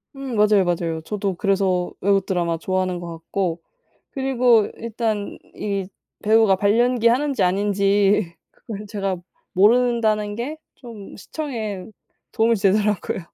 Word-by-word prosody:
음 270 -3 -5
맞아요, 210 -2 +4
맞아요. 165 -2 -1
저도 195 +2 -3
그래서 190 -2 0
외국 195 -1 +2
드라마 170 -3 -1
좋아하는 185 +1 -1
것 170 -1 -7
같고. 170 0 -3 0.5
그리고 250 -5 +3
일단 220 -2 -3 0.2
이 200 -2 -3 0.4
배우가 215 -2 +5
발연기 230 +4 +2
하는지 270 +4 +2
아닌지 200 0 +2 0.2
그거를 210 -2 -9
제가 195 -2 -2 0.4
모른다는 215 0 +3
게 270 +7 -4 0.2
좀 230 -6 -11
시청에 220 -9 -5 0.5
도움이 230 +1 +3
되더라고요. 205 -1 +1
205 Hz, 290 characters per minute, -22 LUFS, 190-230 Hz, 0.5 s, 배우가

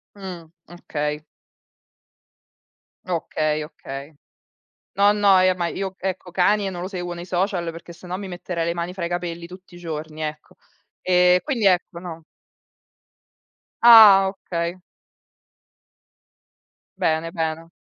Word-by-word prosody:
Mh, 185 -4 -8 0.2
okay. 150 -3 -4 1.8
Okay, 155 -3 -1
okay. 140 -1 -9 0.8
No, 200 +1 +5
no, 200 -2 +4
e 185 0 +4
ma 175 -1 -2
io, 190 0 -4
ecco, 185 -1 -4
Kanye 195 +3 +2
non 175 -2 -6
lo 185 - -4
seguo 180 -3 -5
nei 175 0 -8
social 180 -1 -1
perché 165 +1 -11
se 175 +1 -13
no 180 +1 -3
mi 195 -1 -7
metterei 175 -1 -4
le 170 - 0
mani 175 +1 -4
fra 185 -3 -6
i 170 - -4
capelli 175 -1 -4
tutti 185 +1 -14
i - - -11
giorni, 160 -2 -6
ecco. 155 0 -6 0.5
Ehm, 180 0 +4
quindi 245 -8 -2
ecco, 180 -2 +2
no. 165 -2 -8 1.6
Ah 215 -5 +9
okay. 175 -3 -4 2.2
Bene, 165 -3 0
bene. 160 0 -3
175 Hz, 130 wpm, -22 LUFS, 165-190 Hz, 2.2 s, Ah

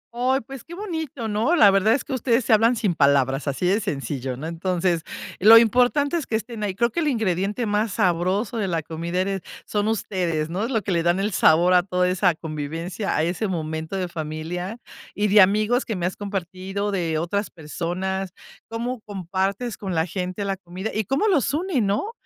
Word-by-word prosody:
Ay, 260 +3 +1
pues, 270 +2 -10
qué 345 - -10
bonito, 320 - -4
¿no? 220 +11 +1
La 205 - +7
verdad 195 +3 +4
es 270 - -3
que 275 - -5
ustedes 245 -1 +1
se 230 - +3
hablan 225 +3 +4
sin 210 -6 0
palabras, 140 -1 +2
así 140 +5 -1
de 195 +4 +3
sencillo, 135 - -3
¿no? 155 - -6
Entonces, 170 0 -1 0.4
lo 225 +4 +9
importante 250 +7 +3
es 310 - -4
que 220 - -1
estén 225 0 -4
ahí. 195 -3 -2
Creo 235 +2 +1
que 340 - -2
el 310 - 0
ingrediente 210 -2 0
más 210 -1 0
sabroso 185 +6 0
de 200 -3 -1
la 165 -3 -1
comida, 170 +3 -3
eres 195 -1 -2 0.2
son 210 0 -1
ustedes, 175 -7 -1
¿no?, 185 +5 -2
es 235 - -4
lo 220 -5 0
que 195 - -2
le 170 - +2
dan 175 +3 +2
el 205 +2 0
sabor 175 +3 +5
a 180 - +6
toda 180 -1 0
esa 180 -2 +2
convivencia, 165 +6 -4
a 155 - +2
ese 180 +5 -1
momento 160 0 -3
de 185 -2 -1
familia, 170 +5 -5 0.4
y 205 0 +1
de 205 0 +7
amigos 215 +6 +3
que 220 - -4
me 175 -1 -2
has 180 - -2
compartido, 195 0 -4
de 165 -5 -1
otras 200 +5 -1
personas, 180 +4 -4 0.4
cómo 235 +1 -4
compartes 195 +3 -3
con 190 -4 -4
la 160 +1 +2
gente 185 +2 -4
la 195 -1 -2
comida, 185 +3 -6
y 215 -2 -1
cómo 280 +11 +1
los 295 - +2
une, 335 -6 0
¿no? 205 - 0
195 Hz, 205 wpm, -23 LUFS, 175-225 Hz, 0.4 s, lo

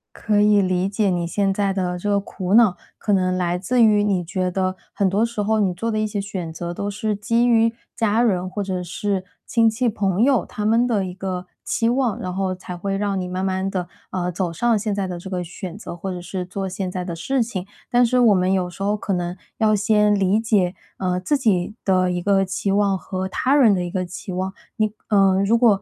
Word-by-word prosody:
可 210 -2 +1
以 210 -1 +5
理 185 0 +1
解 205 -1 +1
你 175 -2 0
现 195 +1 +1
在 200 -1 0
的 180 -2 -1
这 205 +4 -3
个 200 0 +3
苦 190 -1 -4
恼， 225 -6 +6 0.2
可 205 - 0
能 185 -1 +2
来 175 -1 0
自 235 +6 +2
于 210 -2 +5
你 190 -4 +1
觉 185 +1 -1
得 185 0 -1 0.2
很 195 -2 +1
多 205 +4 +2
时 230 -3 -3
候 220 +1 +1
你 190 -3 +2
做 225 +6 -2
的 215 - 0
一 215 - +1
些 205 -1 -3
选 190 -4 -4
择 175 +1 -5
都 200 +3 -3
是 210 +1 -2
基 230 +4 +1
于 230 -1 +4 0.2
家 225 +1 +2
人 185 -5 +1
或 205 +1 -3
者 185 -2 -3
是 190 +2 -2 0.2
亲 230 -1 +3
戚 240 +3 0
朋 200 0 +1
友 265 -2 +3
他 210 - -5
们 230 +3 +4
的 205 -5 +1
一 180 - -6
个 185 -1 -4 0.2
期 230 0 0
望， 245 -4 0
然 180 -1 -4
后 190 -1 -1
才 180 -1 -8
会 195 +2 -2
让 200 -1 -1
你 180 - -3
慢 185 +1 -2
慢 190 0 -1
地， 180 -2 -3 0.2
呃， 180 -1 -1
走 175 -1 -2
上 235 +5 +2
现 210 -1 -2
在 200 -2 -1
的 175 -1 -5
这 190 - -8
个 180 -2 -2
选 180 +2 -7
择， 190 - -7
或 190 +2 -5
者 180 -1 -5
是 180 +1 -4
做 190 +1 -4
现 185 0 -3
在 180 0 -4
的 170 - -4
事 260 +8 0
情。 195 -5 -5 0.3
但 245 0 +5
是 250 +2 +2
我 230 -4 +6
们 185 0 +2
有 180 -2 0
时 195 - -12
候 205 +1 +1
可 205 -1 -4
能 175 0 -2 0.2
要 215 -1 +3
先 210 0 +3
理 195 +2 +2
解， 200 -5 +1 0.2
呃， 180 -1 -1
自 280 +11 +1
己 210 -6 +1
的 185 -1 +2
一 175 0 -2
个 195 0 +3
期 195 +1 -2
望 200 -1 +2
和 185 0 -4
他 255 +7 0
人 235 -8 +6
的 180 - -1
一 175 - -5
个 185 -1 -1
期 180 +2 -8
望。 185 +1 -3 0.2
你 215 -1 +1 0.2
呃， 195 -2 +4
如 230 +3 +4
果 220 -5 +4
195 Hz, 260 characters per minute, -22 LUFS, 185-215 Hz, 0.3 s, 恼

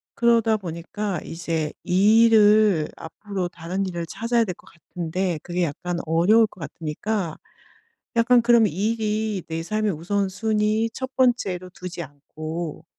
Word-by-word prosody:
그러다 230 -2 +3
보니까 180 +2 -4
이제 165 -2 -3
이 205 +5 +5
일을 210 -6 +5
앞으로 185 +2 -5
다른 180 +3 -4
일을 175 -2 -4
찾아야 235 +3 0
될 180 - -3
것 - - -22
같은데 175 +1 -4
그게 175 0 -1
약간 170 +3 -3
어려울 180 +8 +4
것 185 - -17
같으니까 165 +4 -3 0.8
약간 235 +1 +5
그럼 235 -2 +5
'이 - - -1 0.2
일이 215 -3 -2
내 165 0 -3
삶의 215 +2 -1
우선순위 210 +5 0
1 260 0 -6
번째로 195 -8 +1
두지 180 -1 -6
않고 155 +3 -7
190 Hz, 275 characters per minute, -23 LUFS, 170-220 Hz, 0.8 s, 이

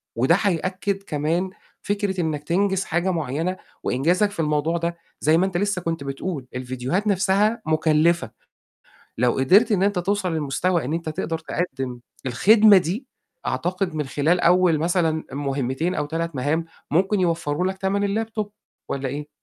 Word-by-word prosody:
وده 130 +9 +4
حيأكد 195 +1 -1
كمان 165 +4 -1 0.3
فكرة 200 -2 -1
إنّك 150 -3 -2
تنجِز 190 +3 +1
حاجة 175 +3 0
معيّنة 165 +3 -2 0.3
وإنجازك 175 +11 +2
في 185 - -10
الموضوع 150 +2 +1
ده، 170 0 -2 0.2
زي 155 +2 +4
ما 185 - +3
أنت 180 -2 -2
لسه 200 -1 0
كنت 165 -3 -2
بتقول 135 0 -4
الفيديوهات 130 - -2
نَفْسها 200 +3 +2
مُكلّفة، 155 +2 +2 0.9
لو 125 0 +3
قدرت 205 - +5
إن 195 -2 +2
أنت 200 -2 +2
توصل 190 -1 0
للمستوى 160 +2 0
إن 145 - -3
أنت 165 -1 -3
تقدر 160 +1 -2
تقدم 135 -7 -4 0.3
الخدمة 205 - +6
دي، 190 - -3 0.4
أعتقد 180 -1 -1
من 150 -1 -1
خلال 155 +6 +1
أول 175 -2 +4
مثلًا 165 -1 +1
مُهمتين 140 +4 -1
أو 150 - -1
3 165 +1 -3
مَهام، 150 +6 0 0.3
ممكن 190 +5 +2
يوفَّروا 170 -1 0
لك 190 0 -3
تَمن 200 +3 0
الlaptop 215 -2 -4 0.4
والّا 135 -1 -2
إيه؟ 145 +3 -5
170 Hz, 150 wpm, -23 LUFS, 150-190 Hz, 0.9 s, الخدمة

